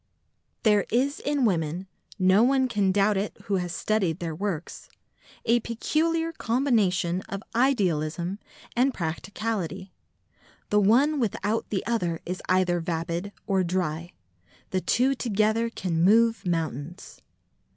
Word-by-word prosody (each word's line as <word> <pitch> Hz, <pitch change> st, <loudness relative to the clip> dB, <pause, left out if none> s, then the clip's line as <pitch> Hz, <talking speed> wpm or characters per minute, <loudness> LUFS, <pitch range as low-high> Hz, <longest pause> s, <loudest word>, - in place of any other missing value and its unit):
There 210 Hz, -2 st, +3 dB
is 270 Hz, +5 st, +1 dB
in 285 Hz, -3 st, 0 dB
women—no 185 Hz, +2 st, 0 dB
one 260 Hz, +2 st, +3 dB
can 205 Hz, -5 st, +1 dB
doubt 200 Hz, +1 st, +3 dB
it 200 Hz, +2 st, -3 dB
who 200 Hz, -1 st, 0 dB
has 180 Hz, -1 st, -3 dB
studied 195 Hz, -5 st, 0 dB
their 165 Hz, -2 st, -4 dB
works—a 200 Hz, +6 st, -4 dB
peculiar 325 Hz, +8 st, 0 dB
combination 220 Hz, -, +1 dB
of 195 Hz, +1 st, -5 dB
idealism 185 Hz, -, +1 dB, 0.4 s
and 255 Hz, +2 st, +2 dB
practicality. 190 Hz, +2 st, -3 dB, 0.8 s
The 210 Hz, -, +5 dB
one 270 Hz, +9 st, +4 dB
without 220 Hz, -1 st, -1 dB
the 195 Hz, -, -2 dB
other 180 Hz, -8 st, -1 dB
is 180 Hz, +2 st, -4 dB
either 185 Hz, -1 st, +3 dB
vapid 170 Hz, +3 st, -3 dB
or 190 Hz, -2 st, +1 dB
dry: 175 Hz, -1 st, -2 dB, 0.6 s
the 185 Hz, -, 0 dB
two 260 Hz, +7 st, +2 dB
together 225 Hz, -1 st, +1 dB
can 170 Hz, -7 st, -1 dB
move 225 Hz, 0 st, +4 dB
mountains. 165 Hz, 0 st, -4 dB
200 Hz, 120 wpm, -26 LUFS, 175-230 Hz, 0.8 s, The